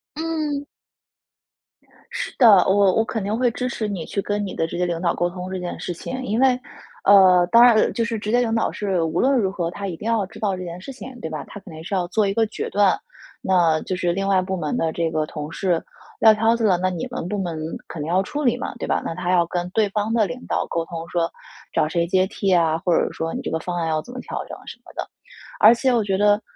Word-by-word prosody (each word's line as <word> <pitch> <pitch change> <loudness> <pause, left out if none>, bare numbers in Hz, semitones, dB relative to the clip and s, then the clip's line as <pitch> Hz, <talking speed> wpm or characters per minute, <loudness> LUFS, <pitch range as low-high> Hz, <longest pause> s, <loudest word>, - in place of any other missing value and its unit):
嗯。 310 -3 -2 1.5
是 - - -4
的。 245 - +7 0.2
我 195 -1 +4
我 225 - +3
肯 220 -3 -3
定 210 +2 -1
会 250 -1 +3
支 250 +2 -3
持 220 -4 -3
你， 185 -6 -4
去 200 - -2
跟 205 0 -2
你 190 - -6
的 165 - -1
直 165 - -6
接 180 - +1
领 170 -1 -2
导 175 - +1
沟 175 - 0
通 180 +1 -7
这 185 - -3
件 175 -1 -5
事 175 - -4
情。 255 +9 -6
因 225 -1 -1
为， 255 -1 +4 0.4
呃， 185 -3 +7
当 235 +1 +8
然 245 -2 +7
呃， 215 - +3
就 235 - -1
是 230 0 -2
直 210 +1 -3
接 245 - +4
领 235 -2 0
导 225 - +1
是 195 -4 -1
无 160 -1 -1
论 270 0 +3
如 195 -4 0
何， 175 -4 -2
她 200 +1 -5
一 175 - -4
定 - - -9
要 225 -3 +1
知 185 - -13
道 200 -3 0
这 185 - -6
件 175 0 -7
事 190 - -8
情， 255 -1 -10
对 160 - -4
吧？ 155 -2 -5
她 205 - -9
肯 175 - -12
定 160 +1 -9
是 190 - -6
要 180 -2 0
做 205 +3 +1
一 195 - 0
个 225 +1 +2
决 - - -5
断， 200 -1 +3 0.4
那 170 -4 +3
就 185 - -3
是 175 -1 0
另 195 +2 -2
外 195 -1 +3
部 190 +1 -3
门 155 -4 -2
的 160 - 0
这 165 0 -1
个 155 -1 0
同 150 0 -7
事 175 -2 0 0.4
撂 220 -1 +7
挑 225 +2 +2
子 235 - -3
了， 185 -4 +4
那 185 +1 0
你 175 -3 -4
们 - - -4
部 205 +2 -2
门 175 -4 -3 0.3
肯 160 - -7
定 150 - -4
要 185 +2 +3
处 295 +8 -4
理 245 -2 +2
嘛， - - -5
对 - - -5
吧？ - - +1
那 - - -2
她 180 0 -2
要 175 -2 +4
跟 175 +1 -3
对 215 -1 +2
方 210 +2 -1
的 225 -2 +3
领 250 +5 -7
导 - - 0
沟 165 -1 -2
通， 165 -1 -7
说： 170 -1 0 0.4
“找 155 - +2
谁 170 +1 0
接 185 +1 +3
替 195 -1 0
啊？” 165 -2 +3
或 175 - +3
者 - - 0
说： 165 0 -4
“你 - - -3
这 - - -4
个 160 - -1
方 180 +2 -4
案 165 -1 -1
要 155 -1 0
怎 245 - -12
么 255 - -6
调 - - -5
整？” - - -9
什 - - -8
么 - - -13
的。 - - -4 0.5
而 220 +3 +8
且 255 +2 +1
我 235 -2 +2
觉 195 -2 0
得， 205 +1 +3
190 Hz, 295 characters per minute, -22 LUFS, 175-225 Hz, 1.5 s, 当